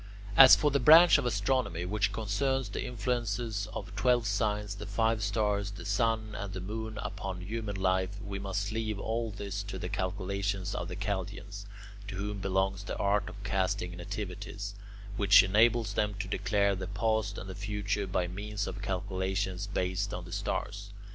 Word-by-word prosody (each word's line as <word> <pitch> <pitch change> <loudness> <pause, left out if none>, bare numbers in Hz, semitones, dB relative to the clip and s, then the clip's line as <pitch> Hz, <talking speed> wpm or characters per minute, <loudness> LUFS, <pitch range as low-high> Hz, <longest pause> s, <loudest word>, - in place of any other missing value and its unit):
As 130 -1 +11
for 150 -1 +2
the 140 - +2
branch 160 +4 +8
of 130 - -1
astronomy 105 -5 0
which 100 +1 0
concerns 125 +4 -1
the - - -4
influences 115 -3 -2
of 105 - -5
the - - -13
twelve 120 +4 +2
signs, 105 -3 0
the 105 +1 -8
five 110 +2 +1
stars, 100 -1 0
the 100 - -9
sun, 110 +1 0
and 100 -1 -5
the 95 - -4
moon 110 +3 -5
upon 95 -3 -5
human 105 +2 -4
life, 95 +1 0
we 100 -1 -5
must 100 +1 -2
leave 110 -1 -2
all 115 +3 -2
this 100 -1 -4
to 100 -1 -6
the 90 -1 -4
calculations 95 +1 -2
of 85 - -3
the 90 - -5
Chaldeans, 100 0 -4 0.4
to 100 - -5
whom 100 +1 -3
belongs 95 0 0
the - - -4
art 105 +1 +1
of 100 -1 -10
casting 95 -3 -1
nativities, 100 +1 -5 0.4
which 100 -1 +7
enables 110 +2 +3
them 105 0 0
to 100 -1 -4
declare 100 0 +1
the 95 0 -5
past 110 +2 0
and 95 - -6
the 95 - -6
future 105 0 -2
by 90 -1 0
means 105 +3 -4
of - - -6
calculations 95 0 -2
based 90 -2 -1
on - - -6
the - - -11
stars. - - -3
100 Hz, 175 wpm, -30 LUFS, 95-110 Hz, 0.4 s, As